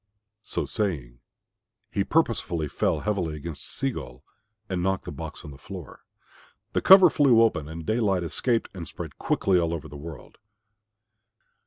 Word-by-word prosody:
So - - -2
saying 70 - -3 0.7
he 100 - +1
purposely 100 - 0
fell - - 0
heavily 95 -7 -1
against 75 +1 -8
Sea 135 0 -1
gull 60 - -8 0.4
and 95 -3 -2
knocked 95 +1 0
the - - -5
box - - -8
on 75 - -8
the 70 - -13
floor. - - -10 0.7
The - - +1
cover 190 -3 +9
flew 125 -6 +5
open 80 -10 0
and 80 0 -7
daylight 105 -4 +1
escaped 115 +8 0
and 85 -4 -7
spread - - -8
quickly 95 -2 +2
over 85 -1 0
all 80 - -10
the 75 - -10
world. 75 +1 -10
90 Hz, 155 wpm, -26 LUFS, 75-110 Hz, 0.7 s, cover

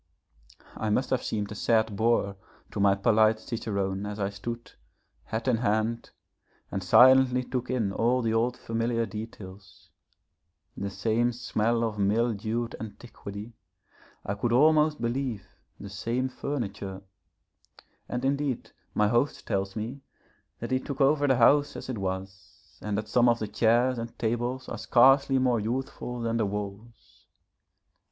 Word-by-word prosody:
I 110 - -2
must 125 +5 0
have 130 -1 +2
seemed 105 -2 -3
a - - -3
sad 110 0 +1
boor 110 -2 +1 0.4
to - - -5
my 100 -1 +4
polite 110 +1 +3
cicerone 100 -4 -3
as 105 +1 -6
I 100 0 -1
stood, 115 +4 -6 0.5
hat 110 +3 -4
in 125 -3 +3
hand, 110 +1 0 0.6
and 95 - -2
silently 125 +5 +6
took 125 0 -4
in 110 -6 0
all 120 +4 +1
the 110 -1 +1
old 120 +2 +1
familiar 115 0 -1
details. 100 -4 -10 0.8
The 100 - -3
same 115 +4 +1
smell 115 -1 0
of 110 -2 -2
mildewed 115 +2 0
antiquity, 110 -1 -9 0.7
I 100 - -1
could 110 +4 -1
almost 150 +4 +4
believe 120 -3 -2 0.3
the - - -8
same 115 +7 -2
furniture. 100 -8 -5 1.1
And 125 +1 -2
indeed 140 -2 -1 0.2
my 105 - +3
host 120 +6 0
tells 95 0 -2
me 115 +6 -5 0.6
that - - -4
he 130 - +2
took 135 0 -6
over 145 +1 +3
the 135 - +4
house 145 +4 +4
as - - -7
it 120 -5 -3
was, 95 -1 -7
and 105 -1 -2
that 105 0 -3
some 120 +2 +4
of 120 - +3
the 110 - -3
chairs 120 +4 +2
and 115 0 -7
tables 120 +3 -2
are 120 - -5
scarcely 135 +4 +5
more 125 -3 +2
youthful 125 +1 -4
than 115 0 -1
the 110 -3 +1
walls. 105 +3 -8
115 Hz, 145 wpm, -27 LUFS, 105-125 Hz, 1.1 s, silently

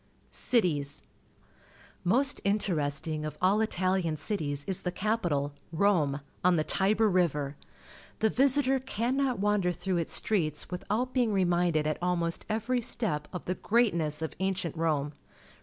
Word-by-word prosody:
Cities. 155 - 0 0.5
— - - -27
Most 275 +2 +1
interesting 155 -6 0
of 155 - -5
all 195 +4 +3
Italian 185 -6 0
cities 145 -4 -3
is 190 - -3
the 180 - -2
capital, 175 -9 -1 0.2
Rome, 160 -6 +2 0.2
on 180 0 +5
the 155 - +2
Tibe 200 +6 +1
r 220 - +6
Rive 180 -6 +2
r. 145 -1 -3 0.6
The 220 -1 +2
visitor 270 0 +3
cannot 255 +1 -1
wander 200 -2 +1
through 180 +1 -2
Its 165 -1 -2
streets 160 -4 +1
without 215 +8 -2
being 245 -4 +2
reminded 175 -5 +2
at 155 0 -1
almost 170 -2 -1
every 230 +3 0
step 165 -11 0
of 180 - -6
the 180 - 0
greatness 170 -9 +1
of 160 - -3
ancient 190 -3 -1
Rome. 155 -3 0
180 Hz, 145 wpm, -29 LUFS, 155-215 Hz, 0.6 s, r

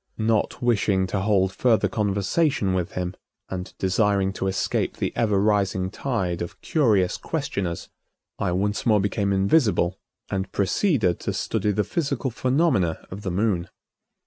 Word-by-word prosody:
Not 110 +1 0
wishing 100 -5 +2
to 95 +1 -2
hold 95 -2 +2
further 115 -1 +3
conversation 105 - +1
with 90 -2 -2
him, 90 0 -3 0.4
and 90 -1 -5
desiring 95 0 +1
to 95 - -2
escape 95 0 -1
the - - -2
ever 105 -4 +2
rising 95 -2 +1
tide 95 -10 -2
of 85 - -6
curious 110 - +2
questioners, 100 - -3 0.5
I 90 - 0
once 105 +3 0
more 110 -3 +4
became 100 0 0
invisible 100 - +2 0.3
and 95 0 -2
proceeded 100 - +1
to - - -3
study 105 - -1
the 105 +1 +1
physical 140 - -2
phenomena 125 - +1
of 95 +2 -6
the 100 - -3
Moon. 90 -2 0
100 Hz, 145 wpm, -24 LUFS, 95-115 Hz, 0.5 s, more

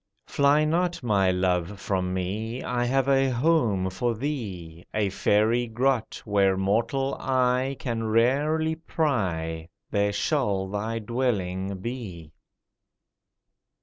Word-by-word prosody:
Fly 145 +2 +3
not, 175 0 0
my 100 -5 +2
love, 90 +1 0
from 95 -2 -1
me— 105 +6 -3
I 120 -1 -1
have 135 +2 +1
a 135 -1 +3
home 120 - +1
for 120 +5 -1
thee— 100 - -5
A 105 -2 +1
fairy 110 +5 +2
grot, 120 0 -1
Where 100 -2 +2
mortal 115 +8 0
eye 130 +1 +1
Can 115 -2 -3
rarely 145 +8 +2
pry, 90 - -2 0.2
There 100 0 +1
shall 100 -4 0
thy 105 +3 -2
dwelling 100 -5 -2
be! 95 -10 -6
115 Hz, 115 wpm, -26 LUFS, 95-130 Hz, 0.2 s, Fly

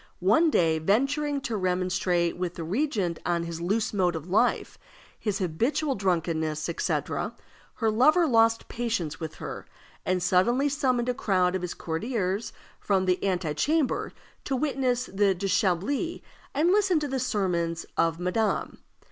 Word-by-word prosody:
One 220 - +4
day, 160 - +2
venturing 275 - +1
to 235 -4 -3
remonstrate 180 -2 0
with 180 -1 -3
the 165 - -5
regent 195 - -1
on 170 -1 0
his 170 0 -5
loose 210 +6 0
mode 180 -4 +1
of 160 +1 -6
life, 185 - +1 0.4
his 210 -3 -1
habitual 235 - 0
drunkenness, 165 - -1
etc., 170 - -2 0.4
her 225 -2 +1
lover 305 +10 +4
lost 225 -4 +3
patience 225 -10 -2
with 160 -2 -6
her, - - -7 0.4
and 185 -1 0
suddenly 240 +11 +3
summoned 255 -4 0
a - - +2
crowd 185 -6 +1
of 185 - -2
his 180 -1 -4
courtiers 195 +3 -2 0.3
from 190 -2 +1
the 180 0 +1
ante 180 -5 0
chamber 295 - 0 0.3
to 270 - -1
witness 255 -3 0
the 195 -2 +1
déshabillé 200 - 0 0.3
and 320 +5 +3
listen 390 -4 +3
to 295 - -2
the 265 -1 -2
sermons 175 -8 -1
of 165 0 +1
madame. 195 +4 -1
195 Hz, 150 wpm, -27 LUFS, 175-255 Hz, 0.4 s, One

